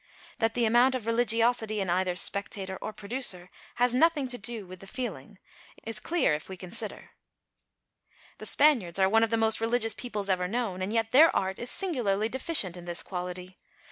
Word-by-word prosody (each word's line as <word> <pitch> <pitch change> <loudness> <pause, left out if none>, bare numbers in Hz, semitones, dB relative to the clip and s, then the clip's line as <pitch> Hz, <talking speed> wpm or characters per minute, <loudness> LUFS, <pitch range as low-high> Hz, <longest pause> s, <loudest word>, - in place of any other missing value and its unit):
That 225 0 0
the 240 -1 +2
amount 240 +4 +4
of 245 -4 -4
religiosity 230 -1 +2
in 195 - -2
either 180 +1 0
spectator 190 +1 -2
or - - -4
producer 200 -4 -4 0.2
has 245 0 +2
nothing 300 0 +3
to 245 - -2
do 215 0 -1
with 185 0 -11
the 195 - -13
feeling 250 +3 -6 0.5
is 225 -1 -4
clear 335 - +1
if 150 +4 -5
we 190 - -7
consider. 180 0 -5 1.3
The - - -5
Spaniards 245 - +3
are 190 -1 +4
one 225 +3 +3
of 225 - +2
the 230 - +1
most 225 0 +2
religious 225 -1 +1
peoples 215 -2 -4
ever 180 -2 0
known, 210 -3 -3
and 190 +2 -2
yet 225 0 0
their 310 +6 +7
art 190 0 -1
is 240 - -4
singularly 225 - 0
deficient 260 - +2
in 175 -1 -10
this 175 -1 -1
quality. 180 0 -7
220 Hz, 185 wpm, -28 LUFS, 190-245 Hz, 1.3 s, their